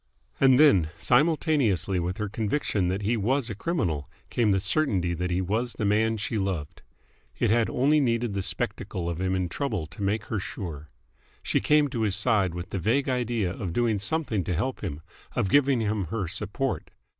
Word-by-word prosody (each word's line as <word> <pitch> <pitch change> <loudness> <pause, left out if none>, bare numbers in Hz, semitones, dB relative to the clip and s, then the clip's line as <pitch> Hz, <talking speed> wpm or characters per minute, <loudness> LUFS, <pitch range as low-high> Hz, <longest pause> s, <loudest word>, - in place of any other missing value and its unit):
And 130 -1 +6
then, 95 - +5
simultaneously 125 - +2
with 90 +2 -2
her 105 -1 -2
conviction 105 -2 -1
that 95 +3 -2
he 115 +4 +1
was 120 +3 0
a - - -2
criminal, 90 - -2 0.2
came 115 -3 +2
the 95 -1 +3
certainty 95 - 0
that 90 +1 -2
he 90 +1 0
was 110 +6 -1
the 110 - -3
man 110 +2 +2
she 110 +1 -2
loved. 95 -7 -3 0.6
It - - +2
had 115 0 +3
only 145 +4 +3
needed 120 -4 0
the 100 - -1
spectacle 90 -1 -3
of 85 0 -3
him 95 0 0
in 90 -1 0
trouble 110 - -2
to 80 - -11
make 100 +2 0
her 110 - -2
sure. 80 -6 -6 0.5
She - - +1
came 150 -1 +3
to 120 -4 -3
his 105 -4 +1
side 100 -8 +1
with 90 +1 -6
the 95 - -2
vague 130 - +1
idea 120 -7 0
of 95 -5 -5
doing 115 -2 +1
something 115 - 0
to 90 - -1
help 125 +10 -2
him, 75 +2 -4 0.3
of 95 - +1
giving 140 -4 +4
him 105 -2 -1
her 95 +2 -3
support. 105 - -2
105 Hz, 190 wpm, -26 LUFS, 95-125 Hz, 0.6 s, And